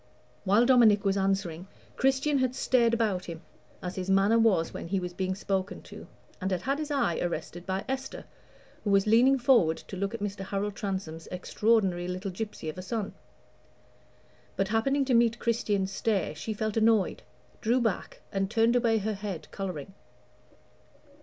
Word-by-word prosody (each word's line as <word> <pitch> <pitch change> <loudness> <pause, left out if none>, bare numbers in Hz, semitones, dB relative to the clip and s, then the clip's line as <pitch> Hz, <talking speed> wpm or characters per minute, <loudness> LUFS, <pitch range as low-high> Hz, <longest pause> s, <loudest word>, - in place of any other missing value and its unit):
While 205 +5 +4
Dominic 230 -6 +5
was 195 0 +2
answering, 190 -3 -1 0.3
Christian 270 +2 +2
had 255 -1 0
stared 240 -3 +3
about 220 -6 0
him, 170 -1 -8 0.4
as 180 +1 -5
his 185 0 -3
manner 195 +4 +4
was 195 -8 +2
when - - -6
he 195 +2 0
was 180 -1 -5
being 185 +1 -2
spoken 195 0 -3
to, - - -11 0.3
and 190 - -1
had 185 -2 -2
had 275 +2 0
his 305 -1 -4
eyes 260 - 0
arrested 175 0 -4
by 190 +1 -2
Esther, 265 0 -4 0.6
who 210 - -1
was 195 -1 +4
leaning 240 +5 +5
forward 235 -11 +4
to - - -9
look 200 +4 -2
at - - -6
Mr. 205 -1 -4
Harold 200 +1 -3
Transome's 190 -6 -4
extraordinary 185 -1 +1
little 185 +2 -4
gypsy 205 -3 -6
of 155 +3 -5
a - - -4
son. 210 +2 -3 1.4
But, 195 0 0
happening 270 +6 +1
to 260 - +1
meet 235 -1 +4
Christian's 205 -5 0
stare, 195 -4 0
she 160 +8 -5
felt 215 0 -2
annoyed, 220 -2 +3 0.4
drew 240 +3 +2
back, 225 -6 -2
and 195 -1 -1
turned 230 +2 +3
away 230 -2 +3
her 215 +1 -1
head, 195 -4 -6
coloring. 185 -3 -5
205 Hz, 170 wpm, -28 LUFS, 190-230 Hz, 1.4 s, Dominic